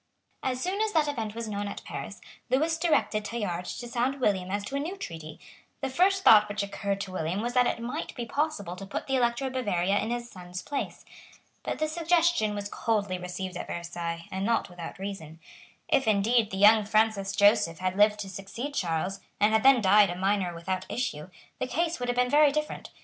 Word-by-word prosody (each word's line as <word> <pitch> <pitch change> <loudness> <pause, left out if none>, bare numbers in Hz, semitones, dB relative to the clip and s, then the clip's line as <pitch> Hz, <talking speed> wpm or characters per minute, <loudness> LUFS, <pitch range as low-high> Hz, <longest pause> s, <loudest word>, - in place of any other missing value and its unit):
As 255 -1 -1
soon 375 +8 -1
as 435 -1 0
that 310 -2 +3
event 225 -7 -3
was 230 -1 -4
known 205 -1 -3
at - - -7
Paris, - - -7 0.3
Lewis 315 +5 +2
directed 310 -10 +1
Tallard 205 -5 -3
to 240 - -6
sound 250 +3 -1
William 190 -7 +1
as 200 +1 -2
to 275 - -5
a - - 0
new 340 +7 -4
treaty. 160 - -8 0.4
The 270 -1 -2
first 380 +6 +3
thought 210 -1 +7
which 205 0 -2
occurred 200 0 -3
to 190 - -5
William 180 +1 -2
was 240 +3 -2
that 250 -1 +4
it - - -1
might 250 +7 -5
be 240 - -4
possible 235 - -2
to 195 - -7
put 200 - -4
the 270 - 0
Elector 240 +1 +1
of 260 - -3
Bavaria 200 -6 +1
in 220 - -2
his 240 0 -3
son's 180 -3 -8
place. 285 -2 -4 0.6
But - - -3
this 310 0 -1
suggestion 330 -9 +2
was 205 0 -4
coldly 205 -4 -1
received 180 +1 -5
at - - -5
Versailles, 170 -1 -5
and 190 +1 -3
not 230 -3 0
without 175 -2 -8
reason. 190 -5 -7 0.5
If, 280 -7 +2
indeed, 215 +2 +3
the 190 - -5
young 210 +2 +7
Francis 215 -2 +1
Joseph 205 -5 +4
had 185 +1 -2
lived 210 +1 +4
to 195 - -6
succeed 200 +9 -6
Charles, 180 - -1 0.2
and 210 +1 +4
had 220 - +4
then 265 -1 +6
died 200 0 +6
a 175 - -3
minor 190 -1 0
without 185 +2 -3
issue, 185 -10 -3 0.3
the 255 - -1
case 330 +5 -1
would 245 0 -2
have 245 - -1
been 250 0 +3
very 295 +2 +5
different. 305 +1 -3
210 Hz, 210 wpm, -28 LUFS, 190-255 Hz, 0.6 s, thought